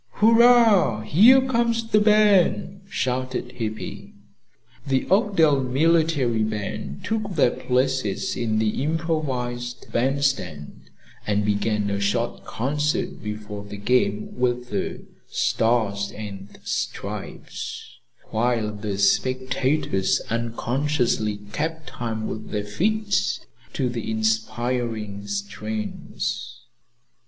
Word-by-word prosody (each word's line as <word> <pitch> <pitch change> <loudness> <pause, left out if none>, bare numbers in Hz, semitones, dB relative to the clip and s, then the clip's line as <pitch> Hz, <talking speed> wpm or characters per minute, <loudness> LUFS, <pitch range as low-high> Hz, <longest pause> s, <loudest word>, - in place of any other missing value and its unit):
"Hurrah! 225 - +5
Here 230 - +6
comes 235 -2 +1
the 210 - +6
band!" 205 -2 +4
shouted 130 -4 -2
Hippy. 110 -3 -6 0.7
The 135 -1 +1
"Oakdale 180 - +4
Military 140 -3 +2
Band" 105 -9 -3
took 215 -4 -2
their 140 -5 +4
places 130 -4 0
in 110 -2 0
the 110 +3 0
improvised 135 -6 -2
bandstand 130 - -1 0.4
and 105 0 +1
began 105 0 0
a 100 - -1
short 110 +4 -1
concert 150 +5 -1
before 105 -1 -6
the 105 0 -8
game 105 -1 +1
with 125 0 -1
the - - -3 0.3
"Stars 110 -4 +1
and 100 -2 -8
Stripes," - - -5 0.3
while 115 -2 0
the 105 -1 -4
spectators 130 0 +1
unconsciously 115 -2 0
kept 160 +2 -2
time 115 -3 -4
with 110 0 -6
their 105 -1 -2
feet 155 - 0 0.4
to 130 - 0
the 120 -3 -4
inspiring 110 -1 -1
strains. 105 +2 -4
120 Hz, 95 wpm, -24 LUFS, 105-150 Hz, 0.7 s, Here